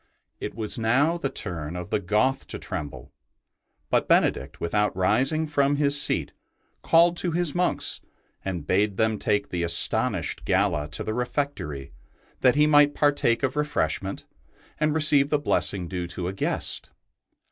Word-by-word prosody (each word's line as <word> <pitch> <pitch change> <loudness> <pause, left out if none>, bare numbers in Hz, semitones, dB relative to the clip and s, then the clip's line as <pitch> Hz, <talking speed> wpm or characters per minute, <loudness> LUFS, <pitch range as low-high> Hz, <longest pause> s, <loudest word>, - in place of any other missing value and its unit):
It - - -6
was 110 0 -2
now 135 +9 +2
the 165 -5 -2
turn 80 - -4
of 90 0 -7
the - - +1
Goth 105 +8 0
to - - -6
tremble; 75 -1 -6 0.8
but - - +2
Benedict, 65 +2 +1
without 105 +3 0
rising 130 +12 +1
from 145 -2 +1
his 145 0 +1
seat, - - 0 0.5
called 170 +1 +4
to 175 -2 0
his 175 -3 0
monks 180 0 0 0.4
and 90 -6 -4
bade 100 +2 +1
them 110 -1 +1
take 105 -1 0
the 90 - -3
astonished 85 -1 +1
Galla 95 -6 +1
to 80 +2 -5
the 110 - -3
refectory 120 - -3 0.5
that 125 0 +4
he 150 +1 +4
might 145 -1 +5
partake 140 -5 +2
of 130 +1 0
re 150 - +1
freshment 95 - -2 0.5
and 150 0 +1
receive 145 -3 +4
the 150 - +2
blessing 100 -10 0
due 90 -1 -4
to 85 +1 -4
a 95 - -3
guest. 95 - -1
110 Hz, 160 wpm, -25 LUFS, 90-145 Hz, 0.8 s, might